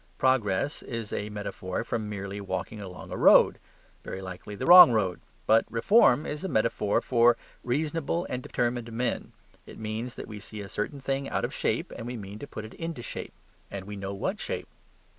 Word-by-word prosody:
Progress 130 -1 +1
is 115 -4 -5
a 105 - -3
metaphor 100 -3 -4
from 110 -3 -3
merely 100 0 -5
walking 105 +2 -4
along 90 -2 -9
a - - -3
road - - +6 0.4
very 95 - -6
likely 95 +2 -8
the 130 - -4
wrong 180 -5 +11
road. 100 -6 0 0.2
But 110 +1 +5
reform 135 - +4
is 150 +3 -4
a - - -1
metaphor 110 -5 +1
for 120 -1 +4 0.3
reasonable 155 +6 -1
and 125 - -3
determined 120 -1 -2
men: 120 +2 -2 0.4
it - - -11
means 110 +3 -4
that - - -7
we 105 -2 -8
see 105 +1 -8
a 100 - -8
certain 120 +9 -3
thing 135 0 -2
out - - 0
of - - -6
shape - - -1
and 115 - -6
we 125 0 -4
mean 100 0 -8
to 145 - -7
put 110 - -7
it 110 - -11
into 165 -7 -5
shape. - - -6 0.4
And 95 -1 -6
we 105 +1 -7
know 100 -1 -5
what 100 - -3
shape. - - -4
115 Hz, 195 wpm, -28 LUFS, 100-130 Hz, 0.4 s, wrong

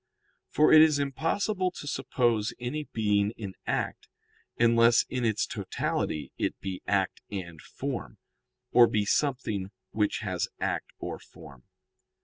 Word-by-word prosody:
For 155 - +4
it 155 - +10
is 155 -2 +5
impossible 180 +7 0
to - - -7
suppose 115 -6 0
any 145 +5 -3
being 105 -1 +1
in 100 -4 -6
act, - - -2 0.5
unless 115 0 +5
in 125 -1 -2
its 110 -3 +1
totality 75 -3 -3
it - - -1
be 95 -2 -5
act 95 -2 0
and 85 -6 -6
form, - - -5 0.5
or 120 -1 +7
be 105 -2 0
something 110 -7 0 0.2
which 105 0 0
has 95 -4 -1
act - - -1
or - - -5
form. 65 -3 -15
115 Hz, 130 wpm, -28 LUFS, 100-135 Hz, 0.5 s, it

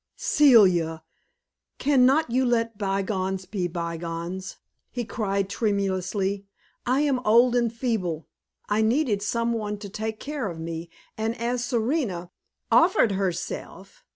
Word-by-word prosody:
"Celia, 195 - +4 0.7
can 265 -3 +4
not 275 -1 +2
you 255 +2 +2
let 230 -2 +1
by 195 -1 -1
gones 190 -1 -2
be 185 -2 -2
by 170 -1 -4
gones?" 170 +3 -5 0.3
he 240 -1 -4
cried, 200 -3 -1
tremulously. 200 -1 -1 0.4
"I 260 +3 +3
am 280 -4 +2
old 240 +3 +5
and 235 -2 +2
feeble. 220 - -2 0.4
I 210 +1 +1
needed 225 -2 +1
some 230 +3 0
one 210 -2 -3
to 205 -1 -8
take 220 +2 -4
care 280 -7 -3
of 165 -2 -7
me, 165 +1 -5 0.3
and 225 +2 -1
as 240 +1 -1
Serena 230 - -1 0.2
" - - -51
"Offered 330 - +5
herself? 195 - -4
215 Hz, 140 wpm, -25 LUFS, 190-240 Hz, 0.7 s, old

